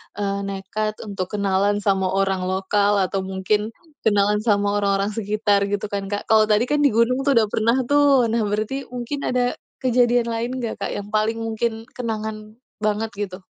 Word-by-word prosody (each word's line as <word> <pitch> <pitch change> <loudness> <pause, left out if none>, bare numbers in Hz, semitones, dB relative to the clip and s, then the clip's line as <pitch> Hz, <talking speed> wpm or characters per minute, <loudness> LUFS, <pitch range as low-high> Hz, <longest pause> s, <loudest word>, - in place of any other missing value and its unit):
eee, 200 -1 -2
nekat 205 +2 -3
untuk 190 -3 -3
kenalan 200 +1 +1
sama 195 -2 +2
orang 190 -1 0
lokal 200 +2 +1
atau 195 +1 -1
mungkin 190 +3 0 0.4
kenalan 205 0 +3
sama 205 -1 +2
orang-orang 200 +1 +1
sekitar, 205 -1 +1
gitu 205 0 -2
kan, 200 -1 -3
Kak? 205 0 -3
Kalau 215 -1 +5
tadi 215 +2 +3
kan 295 0 +2
di - - +8
gunung 235 +3 +3
tuh, 275 - +4
udah 220 -2 +4
pernah 230 +3 +2
tuh. 280 -3 +4
Nah, 230 -1 +1
berarti 215 +7 -2
mungkin 250 +3 -4
ada 245 0 0 0.3
kejadian 245 -1 +3
lain 230 +2 -2
nggak, 230 -2 -3
Kak, 200 - -3
yang 205 0 -5
paling 220 +1 +1
mungkin 225 0 -2
kenangan 220 -2 -5 0.3
banget, 215 +1 0
gitu? 195 -3 -4
210 Hz, 175 wpm, -22 LUFS, 200-230 Hz, 0.4 s, di